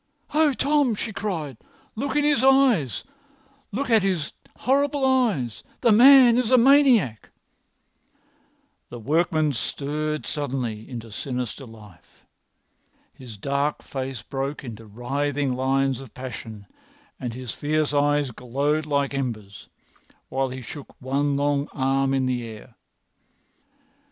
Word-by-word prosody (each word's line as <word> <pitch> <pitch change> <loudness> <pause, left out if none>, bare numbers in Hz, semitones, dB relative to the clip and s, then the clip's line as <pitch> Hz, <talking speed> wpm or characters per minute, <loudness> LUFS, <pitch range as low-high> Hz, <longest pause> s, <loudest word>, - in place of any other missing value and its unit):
"Oh, 305 -1 +4
Tom!" 280 -3 +2
she 220 +1 -4
cried. 160 - -4 0.4
"Look 270 +5 -3
at 295 - +3
his 290 -4 +2
eyes—look 270 - 0
at 220 -2 +5
his 185 -5 -1 0.3
horrible 280 +1 +1
eyes! 220 - +1 0.2
The 235 - +4
man 250 +1 +8
is 245 -3 0
a 255 - +6
maniac." 245 - +4 1.6
The 120 - -8
workman 155 +4 +1
stirred 150 +6 -3
suddenly 125 -7 -4
into 115 -3 -8
sinister 125 +2 -5
life. 105 -5 -17 0.9
His 120 -5 -11
dark 140 +6 -1
face 130 -3 -5
broke 140 +2 -4
into 115 -3 -9
writhing 135 +5 -2
lines 135 0 +1
of 135 -3 -12
passion, 115 -5 -8 0.5
and 120 -3 -5
his 125 -3 -6
fierce 150 0 -1
eyes 145 -1 +2
glowed 140 +6 -1
like 140 -1 0
embers, 105 - -5 0.6
while 135 0 -1
he 130 +1 -7
shook 140 +4 -10
one 140 +2 0
long 145 0 0
arm 135 0 +1
in 135 -1 +1
the 125 -1 -1
air. 110 +2 -11
140 Hz, 120 wpm, -24 LUFS, -, 1.6 s, man